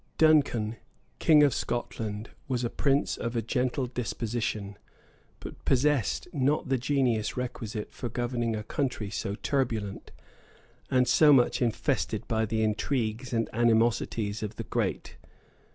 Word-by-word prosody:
Duncan, 135 Hz, -8 st, +3 dB, 0.4 s
king 150 Hz, -2 st, +6 dB
of 140 Hz, -4 st, +4 dB
Scotland, 110 Hz, -2 st, -3 dB, 0.2 s
was 125 Hz, -2 st, -1 dB
a 120 Hz, -, -1 dB
prince 140 Hz, 0 st, +1 dB
of 115 Hz, +1 st, -4 dB
a 115 Hz, -, +1 dB
gentle 125 Hz, +3 st, 0 dB
disposition, 115 Hz, -4 st, -3 dB, 0.6 s
but -, -, -10 dB
possessed 135 Hz, -, +1 dB
not 140 Hz, -1 st, +1 dB
the 135 Hz, -1 st, +2 dB
genius 125 Hz, -5 st, 0 dB
requisite 115 Hz, -4 st, -4 dB
for 120 Hz, -, -5 dB
governing 120 Hz, -1 st, -1 dB
a 105 Hz, -, -4 dB
country 120 Hz, -4 st, -2 dB
so 100 Hz, 0 st, -3 dB
turbulent, 115 Hz, -8 st, -1 dB, 0.8 s
and 125 Hz, -1 st, +3 dB
so 155 Hz, -2 st, +6 dB
much 130 Hz, -2 st, +4 dB
infested 115 Hz, -3 st, -1 dB
by 110 Hz, -1 st, 0 dB
the 110 Hz, +1 st, 0 dB
intrigues 110 Hz, +2 st, -1 dB
and 115 Hz, -2 st, 0 dB
animosities 115 Hz, -2 st, +1 dB
of 105 Hz, 0 st, -4 dB
the -, -, -5 dB
great. -, -, -3 dB
120 Hz, 135 wpm, -28 LUFS, 110-130 Hz, 0.8 s, king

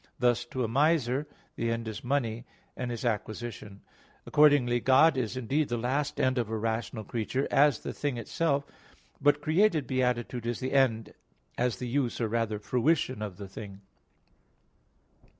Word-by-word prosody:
Thus 120 Hz, -1 st, +2 dB
to 125 Hz, +1 st, -3 dB
a -, -, 0 dB
miser 140 Hz, +1 st, +2 dB, 0.3 s
the 115 Hz, -, -1 dB
end 115 Hz, 0 st, -2 dB
is 110 Hz, -, -6 dB
money, 120 Hz, -3 st, -1 dB, 0.3 s
and 125 Hz, -1 st, -4 dB
its 120 Hz, 0 st, -5 dB
acquisition. 110 Hz, -2 st, -4 dB, 0.4 s
Accordingly 145 Hz, -5 st, +4 dB
God 135 Hz, +6 st, +5 dB
is 130 Hz, -1 st, -2 dB
indeed 135 Hz, +5 st, 0 dB
the 120 Hz, -, -1 dB
last 135 Hz, +5 st, -1 dB
end 130 Hz, -1 st, +2 dB
of 115 Hz, -3 st, -2 dB
a 110 Hz, -, -2 dB
rational 110 Hz, 0 st, -2 dB
creature, 120 Hz, +5 st, -2 dB
as 140 Hz, -4 st, +4 dB
the -, -, -5 dB
thing 145 Hz, -4 st, -2 dB
itself; 140 Hz, +4 st, 0 dB, 0.6 s
but 145 Hz, 0 st, +3 dB
created 160 Hz, -1 st, +3 dB
beatitude 125 Hz, -2 st, -1 dB
is 120 Hz, -, -2 dB
the 130 Hz, +1 st, -3 dB
end, 120 Hz, -5 st, +2 dB, 0.4 s
as 120 Hz, -2 st, 0 dB
the 125 Hz, -, -5 dB
use, 125 Hz, -1 st, -1 dB
or 115 Hz, -, 0 dB
rather 110 Hz, -1 st, -1 dB
fruition, 130 Hz, +3 st, 0 dB
of 105 Hz, -4 st, -5 dB
the 100 Hz, -1 st, -7 dB
thing. 100 Hz, 0 st, -9 dB
125 Hz, 160 wpm, -29 LUFS, 115-140 Hz, 0.6 s, God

